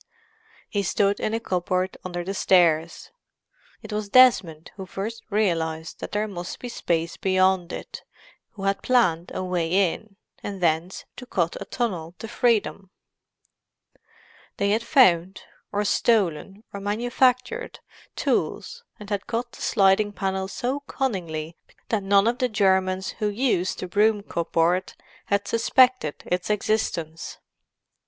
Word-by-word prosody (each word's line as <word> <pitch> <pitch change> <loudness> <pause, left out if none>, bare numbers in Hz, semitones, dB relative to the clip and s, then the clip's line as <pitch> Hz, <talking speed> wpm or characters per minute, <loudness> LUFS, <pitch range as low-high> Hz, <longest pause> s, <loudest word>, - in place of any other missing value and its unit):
He 205 - -1
stood 200 +1 +1
in 215 - -1
a - - -1
cupboard 185 -2 -1
under 175 -1 -4
the 195 +3 -4
stairs. 170 -4 +2 0.7
It - - -7
was 210 -1 -3
Desmond 200 -10 +4
who 190 -2 -8
first 215 +5 -5
realized 165 -6 -1
that - - -6
there 210 +1 -1
must 175 -3 -6
be 245 - -6
space 170 -6 -2
beyond 185 -2 +2
it, - - -7 0.5
who 195 - -9
had 195 0 0
planned 180 -10 +2
a - - -3
way 180 0 +1
in, 215 -2 -13 0.3
and 200 -2 -6
thence 170 +1 0
to 250 - -9
cut 170 -7 0
a - - -5
tunnel 175 -8 -3
to 225 - -7
freedom. 220 -4 0 1.7
They 200 0 +1
had 220 +2 +2
found, 190 - +3 0.3
or 205 0 -1
stolen, 200 -3 +1
or 200 - -5
manufactured, 250 - 0 0.4
tools, 480 0 -2 0.2
and 210 - -10
had 200 -1 -2
cut 240 +1 -3
the - - -13
sliding 205 0 +3
panel 190 -1 -2
so 255 +7 -2
cunningly 175 - -3 0.3
that 220 -3 +1
none 195 +1 +4
of 240 +1 0
the 255 - +1
Germans 190 -2 +1
who 210 - +1
used 205 -5 0
the 185 - -4
broom 210 +2 +2
cupboard 170 +1 0 0.3
had 200 0 0
suspected 250 - +2
its 180 +2 -2
existence. 185 -6 -2
195 Hz, 140 wpm, -24 LUFS, 175-220 Hz, 1.7 s, Desmond